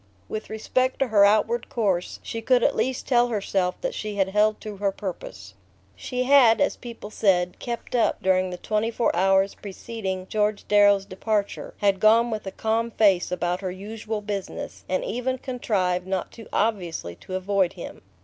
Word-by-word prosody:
With 215 - -5
respect 255 +4 0
to 270 - 0
her 205 -2 +5
outward 220 +3 +2
course 195 -6 -1
she 230 - -5
could 245 +1 +3
at - - +3
least 260 0 -1
tell 245 -2 +4
herself 195 -5 -1
that - - -2
she 215 -1 -5
had 195 -1 +1
held 210 +2 +2
to 210 -2 -7
her 200 0 0
purpose. 200 - -7 0.4
She 250 -1 -3
had, 255 -4 +6
as 285 - +2
people 230 -3 -9
said, 180 -4 +1
"kept 235 -1 -6
up" 235 - +2
during 185 0 +2
the 180 - -6
twenty 215 +4 -1
four 230 -4 0
hours 195 +2 +3
preceding 195 -2 -6
George 210 +1 -1
Darrow's 205 -1 +5
departure; 205 +2 -3
had 200 -2 +2
gone 230 +3 +5
with 215 -2 -4
a - - -3
calm 225 +3 -1
face 200 -6 +3
about 180 0 -1
her 190 - -3
usual 210 +3 -5
business, 205 -2 -5
and 185 0 0
even 255 +3 -2
contrived 190 -9 -1
not 190 -1 -2
too 225 - -12
obviously 180 - -1
to 185 - -7
avoid 190 -1 +1
him. - - -9
210 Hz, 180 wpm, -25 LUFS, 190-230 Hz, 0.4 s, had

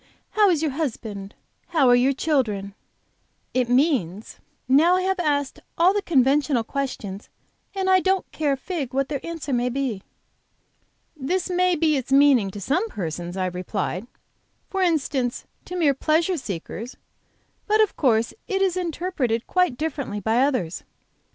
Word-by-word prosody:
how 420 -2 +4
is 325 -4 +1
your 310 - +1
husband? 220 -9 -4 0.3
How 310 -7 +3
are 245 - +7
your 250 +3 +3
children? 235 -9 -1 0.4
' - - -45
it 240 - -3
means, 245 - 0 0.3
'Now 310 +7 +5
I 370 - 0
have 380 0 0
asked 285 -4 0 0.2
all 355 +3 +5
the 410 - 0
conventional 280 - +2
questions, 220 -6 -5 0.5
and 380 -1 -1
I 375 0 +5
don't 380 0 0
care 295 -3 0
a - - -2
fig 275 -4 -4
what 275 0 0
their 285 -3 -3
answer 330 -4 -4
may 245 0 +1
be.'" 250 -6 -2 1.1
"This 350 +7 -2
may 360 0 +2
be 310 -2 +2
its 260 0 -5
meaning 270 -7 +5
to 205 - -8
some 320 - 0
persons," 175 - -5
I 185 - 0
replied, 185 +3 -3 0.6
"for 385 - -1
instance, 280 -8 0 0.2
to 360 - -7
mere 315 -6 +3
pleasure 320 +6 +1
seekers. 225 - -6 0.7
But 430 +1 +3
of 430 -2 +3
course 230 -5 +2
it 390 -4 0
is 375 -2 +1
interpreted 330 -9 -2
quite 360 -9 +1
differently 285 -8 -3
by 220 +4 +1
others. 250 - 0
275 Hz, 155 wpm, -23 LUFS, 235-340 Hz, 1.1 s, are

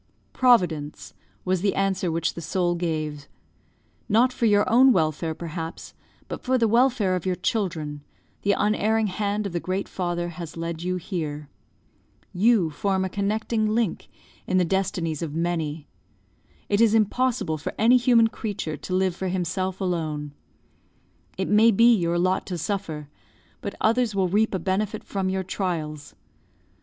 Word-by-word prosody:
"Providence," 175 - +2 0.3
was 185 -1 +1
the 200 0 +1
answer 190 -2 0
which 165 0 -1
the 170 - -7
soul 175 +1 0
gave. 155 -4 -3 0.8
"Not 240 +4 +4
for 235 - +1
your 205 -1 +3
own 260 +4 +6
welfare, 160 - 0
perhaps, 165 0 -6 0.3
but - - -6
for 260 0 +1
the 230 -2 +3
welfare 235 -4 +3
of 180 +1 -3
your 185 - +1
children, 170 -7 -2 0.4
the 200 - +2
unerring 215 +2 +1
hand 205 +1 -1
of 195 - -4
the 175 - 0
Great 185 +3 -3
Father 175 -1 -2
has 170 -1 -8
led 165 0 -4
you 180 +1 -1
here. 155 -5 -4 0.8
You 195 -3 +3
form 190 +4 0
a - - -3
connecting 215 +3 -1
link 230 -6 -1 0.4
in 185 - +1
the 180 - +3
destinies 170 -4 -1
of 155 -3 -4
many. 165 -3 -2 0.8
It 205 +2 +2
is 225 -1 +5
impossible 225 -6 +1
for - - -5
any 235 +3 +5
human 235 -2 +4
creature 200 -9 -4
to 185 - -4
live 185 -1 +1
for 190 - -3
himself 185 +1 -2
alone. 155 -6 -2 1.0
It 190 - -1
may 215 +2 +5
be 230 +3 +6
your 170 -3 0
lot 185 +2 +1
to 180 - -3
suffer, 165 -4 -3 0.5
but 200 - -5
others 230 -1 +2
will 190 -2 +2
reap 205 +3 +1
a - - +1
benefit 200 +4 -2
from 190 -2 -2
your 190 0 -1
trials. 165 -6 -4
185 Hz, 155 wpm, -25 LUFS, 165-210 Hz, 1.0 s, own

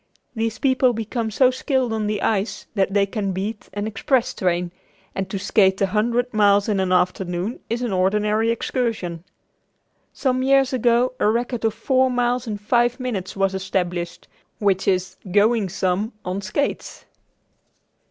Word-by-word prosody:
These 225 -1 -1
people 260 -2 +3
become 225 +1 -3
so 255 +4 +4
skilled 260 -2 -1
on 215 -1 -1
the 210 -1 -2
ice 210 0 -1
that 195 -3 +1
they 200 -1 +4
can 200 -1 -3
beat 205 +4 -4
an 205 +1 -3
express 230 +4 0
train, 175 -1 -1 0.4
and 195 -1 -3
to 195 - -3
skate 195 -1 +2
a 195 - +3
hundred 235 +5 0
miles 205 -1 +4
in 205 -3 +1
an 190 -1 0
afternoon 180 +3 0
is 235 +2 -2
an 235 -5 -1
ordinary 210 +4 +1
excursion. 230 -8 -2 0.9
Some 255 -1 0
years 270 0 +3
ago 245 0 +2
a - - +3
record 240 +1 -1
of 220 -1 +1
four 260 +3 +2
miles 245 0 0
in 210 -2 -3
five 240 +4 +1
minutes 220 -8 -4
was 195 -1 +1
established 180 -2 -3 0.3
which 195 -3 +1
is 185 -1 0
"going 210 +1 +3
some" 190 +4 -1
on 185 +2 -3
skates. 210 +8 -3
215 Hz, 155 wpm, -22 LUFS, 195-240 Hz, 0.9 s, so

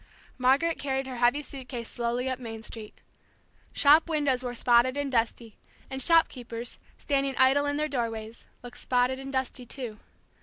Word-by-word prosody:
Margaret 275 +6 +3
carried 270 -1 -1
her 260 -2 -6
heavy 245 +5 +2
suit 265 -3 -9
case 235 -3 -5
slowly 240 +2 -2
up 260 0 -2
Main 225 -2 -7
Street. 220 -2 -8 0.8
Shop 305 +3 +5
windows 290 -5 +1
were 245 -1 -4
spotted 245 +2 +3
and 285 -1 -2
dusty, 230 -2 -1 0.3
and 265 0 -4
shopkeepers, 245 -7 +1 0.2
standing 275 -2 -1
idle 270 +2 +4
in 285 0 -1
their 305 0 0
doorways, 230 -4 -4 0.2
looked 245 0 -10
spotted 250 +1 +1
and 270 0 -7
dusty 260 -1 -2
too. 235 -4 -6
255 Hz, 160 wpm, -28 LUFS, 240-275 Hz, 0.8 s, Shop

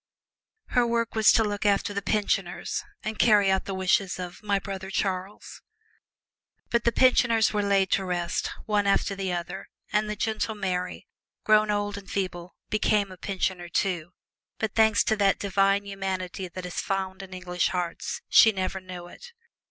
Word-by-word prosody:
Her 245 -2 +2
work 230 0 0
was 220 -1 +5
to 225 - +4
look 205 -1 -2
after 205 0 +2
the 200 - -2
"pensioners" 215 - -1 0.2
and 215 0 -4
carry 205 -4 +5
out 190 - +1
the 195 - -4
wishes 190 0 +1
of 180 -1 -7
"my 200 -1 +1
brother 195 -1 -6
Charles." 190 0 -3 1.1
But 235 -1 +1
the 235 - +4
pensioners 230 -3 +4
were 210 - +1
laid 200 - -1
away 195 -1 +4
to 195 - -4
rest, 175 -1 -2 0.2
one 205 -1 +1
after 200 0 +2
the 195 -1 -3
other, 175 +2 -5 0.2
and 210 0 +1
the 210 - -2
gentle 220 +1 -2
Mary, 180 -3 -3 0.4
grown 215 0 +4
old 205 -1 -1
and 200 - -15
feeble, 185 -2 -4 0.2
became 210 -2 +1
a - - -9
pensioner, 185 -2 -3
too, 175 -2 -1 0.4
but 220 -2 -2
thanks 220 -1 +4
to 220 - +1
that 200 -1 +3
divine 195 0 +2
humanity 190 -1 -4
that 180 +1 -8
is 180 - -3
found 190 -1 -3
in 195 -1 -10
English 180 -1 -1
hearts, 175 -2 -3
she 220 - +7
never 190 -1 -3
knew 180 -1 -8
it. 485 - -13
195 Hz, 175 wpm, -26 LUFS, 185-210 Hz, 1.1 s, she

